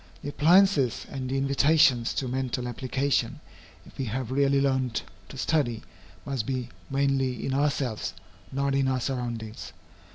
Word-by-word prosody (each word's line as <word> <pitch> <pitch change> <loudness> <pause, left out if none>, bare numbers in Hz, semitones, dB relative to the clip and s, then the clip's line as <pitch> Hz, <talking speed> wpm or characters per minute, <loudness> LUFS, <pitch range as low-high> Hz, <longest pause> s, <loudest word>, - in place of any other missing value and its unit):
The 145 - -3
appliances 155 - +4
and 130 -2 -4
the 135 - 0
invitations 140 -2 +3
to 130 - -1
mental 125 -1 -2
application, 130 +1 -1 0.5
if - - -17
we 135 - -1
have 125 +2 -3
really 140 +1 +3
learned 130 -3 +1 0.3
to - - -9
study, 130 -6 0 0.4
must 135 -6 -2
be 130 -2 -2 0.2
mainly 135 -3 0
in 135 - -1
ourselves, 140 -5 -1 0.4
not 140 +1 0
in 135 -1 +2
our 130 -1 +1
surroundings. 120 -4 -4
135 Hz, 140 wpm, -27 LUFS, 125-140 Hz, 0.5 s, appliances